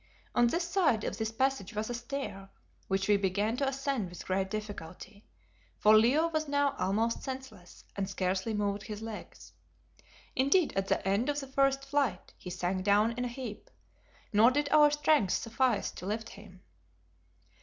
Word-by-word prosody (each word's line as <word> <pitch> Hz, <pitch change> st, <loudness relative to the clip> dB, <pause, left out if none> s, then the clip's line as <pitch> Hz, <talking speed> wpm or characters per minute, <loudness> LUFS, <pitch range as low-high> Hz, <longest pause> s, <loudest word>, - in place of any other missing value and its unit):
On 240 Hz, -, +4 dB
one 330 Hz, +8 st, 0 dB
side 340 Hz, -, +1 dB
of -, -, -4 dB
this 220 Hz, 0 st, -1 dB
passage 260 Hz, -4 st, -1 dB
was 215 Hz, +1 st, -2 dB
a 245 Hz, -, -3 dB
stair, 235 Hz, -6 st, -5 dB, 0.4 s
which 195 Hz, 0 st, 0 dB
we 205 Hz, -1 st, +5 dB
began 200 Hz, +3 st, 0 dB
to 275 Hz, 0 st, 0 dB
ascend 270 Hz, -7 st, -2 dB
with 175 Hz, -1 st, -10 dB
great 190 Hz, 0 st, -1 dB
difficulty, 205 Hz, 0 st, -7 dB, 0.5 s
for 215 Hz, +1 st, +6 dB
Leo 255 Hz, +10 st, +4 dB
was 310 Hz, -1 st, -1 dB
now 285 Hz, -1 st, +1 dB
almost 220 Hz, +5 st, 0 dB
senseless 260 Hz, -9 st, -8 dB
and 195 Hz, -1 st, -2 dB
scarcely 190 Hz, +3 st, -1 dB
moved 205 Hz, -1 st, -1 dB
his 210 Hz, +1 st, -7 dB
legs. 225 Hz, -2 st, -9 dB, 0.8 s
Indeed 285 Hz, +6 st, +3 dB
at 195 Hz, 0 st, 0 dB
the -, -, +3 dB
head 200 Hz, +7 st, 0 dB
of 290 Hz, 0 st, 0 dB
the 275 Hz, -, -6 dB
first 275 Hz, 0 st, +1 dB
flight 275 Hz, -9 st, -1 dB
he 180 Hz, -, -9 dB
sank 180 Hz, +1 st, -2 dB
down 205 Hz, +3 st, +4 dB
in 245 Hz, +2 st, -3 dB
a -, -, -1 dB
heap, 240 Hz, -3 st, -7 dB, 0.6 s
nor 215 Hz, +3 st, +7 dB
did 285 Hz, +2 st, 0 dB
our 300 Hz, -1 st, +6 dB
strength 295 Hz, -8 st, +2 dB
suffice 230 Hz, -1 st, 0 dB
to 180 Hz, -, -8 dB
lift 220 Hz, +2 st, -3 dB
him. 195 Hz, -3 st, -14 dB
220 Hz, 170 wpm, -30 LUFS, 200-275 Hz, 0.8 s, nor